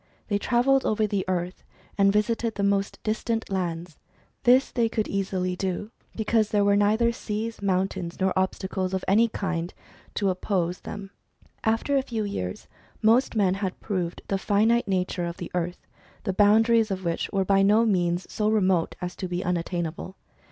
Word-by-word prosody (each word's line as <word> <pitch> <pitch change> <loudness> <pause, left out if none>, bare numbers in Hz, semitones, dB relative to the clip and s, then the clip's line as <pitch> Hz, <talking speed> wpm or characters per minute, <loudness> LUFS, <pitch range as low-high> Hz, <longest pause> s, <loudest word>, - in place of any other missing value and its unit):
They 205 -1 +1
travelled 260 +4 +3
over 215 0 +1
the 200 -2 -1
earth, 180 0 -2 0.3
and 200 -1 +4
visited 225 +2 0
the 200 - -2
most 200 0 +1
distant 225 0 -2
lands. 170 -3 -3 0.5
This 255 +2 +5
they 235 -2 +1
could 220 -2 -1
easily 185 -2 -1
do, 190 +3 -3 0.2
because 220 -1 +1
there 205 -1 +2
were 200 0 +4
neither 215 +3 +3
seas, 225 0 -4
mountains, 190 -3 -1
nor 190 0 +2
obstacles 190 0 -1
of 190 - -3
any 220 +5 +5
kind 180 -5 -3 0.4
to 195 -2 +1
oppose 180 -1 -1
them. 200 -1 -8 0.5
After 225 +6 +1
a 270 - +4
few 230 -5 -3
years, 90 - -4 0.4
most 230 +3 +4
men 195 -4 +3
had 190 -1 -3
proved 180 -5 -3
the 195 - -1
finite 220 +4 +2
nature 185 -2 -1
of 170 0 -5
the 175 -3 -7
earth, 175 0 -3 0.4
the 190 - -1
boundaries 220 +3 +4
of 190 -2 -4
which 170 -1 -1
were 195 -1 +1
by 195 0 +4
no 210 +4 +4
means 175 -4 +1
so 210 -1 -1
remote 190 -6 +2
as 180 - -4
to 185 - -3
be 180 +1 -3
unattainable. 175 0 -3
195 Hz, 170 wpm, -26 LUFS, 185-220 Hz, 0.5 s, This